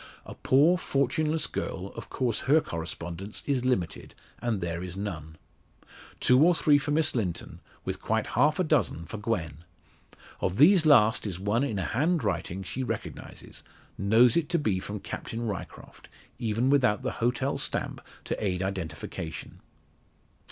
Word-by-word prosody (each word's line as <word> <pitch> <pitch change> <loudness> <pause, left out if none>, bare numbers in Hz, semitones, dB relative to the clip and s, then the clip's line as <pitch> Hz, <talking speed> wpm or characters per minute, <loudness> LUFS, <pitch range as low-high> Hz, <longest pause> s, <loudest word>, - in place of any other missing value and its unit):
A - - -8
poor, 155 +7 +4
fortuneless 155 +2 0
girl, 95 +1 -4
of - - -8
course 120 -4 -1
her 155 +3 +7
correspondence 85 - -5
is 135 -3 0
limited, 95 -10 -1 0.2
and 115 -4 -1
there 85 -1 -3
is 90 0 -6
none. 80 -6 -5 0.8
Two 125 +2 +5
or 175 +1 +5
three 150 -1 +4
for 140 - -4
Miss 155 +1 +2
Linton, 100 -9 -3 0.3
with - - -3
quite - - 0
half 150 +6 +2
a 185 - +2
dozen 85 - +1
for 110 - -7
Gwen. 85 - -3 0.8
Of 90 - -1
these 160 +3 +6
last 110 -7 +5
is 90 -3 -4
one 105 +6 +1
in 115 -8 -1
a 95 - -1
handwriting 105 - -1
she 125 +8 -4
recognises 130 - -6 0.3
knows 110 +4 +4
it 170 -3 +1
to 175 - +2
be 105 - 0
from 105 +1 -6
Captain 115 +1 -5
Ryecroft, 100 -5 -7 0.3
even 115 +2 +1
without 125 -5 +3
the 130 - -1
hotel 125 +3 0
stamp - - -2 0.2
to - - -3
aid 90 -2 0
identification. 80 -4 -5
115 Hz, 150 wpm, -28 LUFS, 95-140 Hz, 0.8 s, her